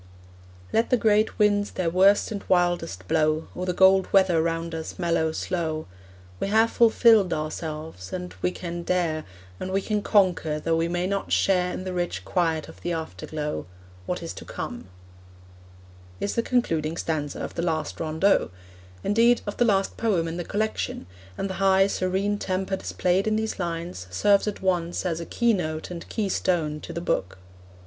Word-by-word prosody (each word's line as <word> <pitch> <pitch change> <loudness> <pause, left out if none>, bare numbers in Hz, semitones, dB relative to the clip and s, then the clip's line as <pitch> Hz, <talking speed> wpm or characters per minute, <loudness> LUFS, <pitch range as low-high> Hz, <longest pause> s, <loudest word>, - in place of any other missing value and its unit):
Let 225 +1 +2
the 250 - +4
great 215 -1 +2
winds 205 -1 +3
their 175 -3 -2
worst 195 +4 +4
and 205 -2 -4
wildest 175 - +1
blow, 155 0 +1
Or 180 +1 -4
the 180 - +1
gold 190 +1 +5
weather 185 -4 +4
round 165 0 -2
us 160 -1 -5
mellow 165 -2 +1
slow; 160 -1 -2 0.5
We - - -1
have 220 +3 +3
fulfilled 225 -4 +5
ourselves, 155 - -5
and 180 -1 -5
we - - +2
can 175 -1 -5
dare, 170 -3 0 0.3
And 185 - -4
we 195 - +2
can 210 +1 -1
conquer, 180 -7 +2
though 165 +1 0
we 165 +1 +1
may 175 +1 -1
not 195 +1 -2
share 180 -2 +2
In 185 - -5
the 185 -1 -4
rich 175 -1 -2
quiet 165 -4 0
of - - -14
the 175 - -2
afterglow, 155 - -4 0.4
What - - -3
is - - -5
to - - -9
come, - - -6 1.3
is 200 - -1
the 230 - +1
concluding 165 -11 0
stanza 150 -3 -2
of - - -5
the - - -2
last 160 -3 -2
rondeau 160 +5 +2 0.5
indeed, 230 +3 +4
of 205 - -5
the 240 - +3
last 195 -3 +1
poem 190 -8 +1
in 165 +1 -4
the 175 - -3
collection, 215 - -2 0.3
and - - -2
the 190 - -4
high, 195 0 +5
serene 195 +1 0
temper 190 0 -1
displayed 190 +1 0
in 215 - +2
these 220 -1 -2
lines 165 - -4
serves 200 - +3
at 205 -2 -4
once 175 -2 0
as 170 -2 -1
keynote 180 -10 0
and 170 -1 -7
keystone 175 -7 0
to - - -8
the 170 0 -4
book. 95 - -1
180 Hz, 170 wpm, -25 LUFS, 165-200 Hz, 1.3 s, gold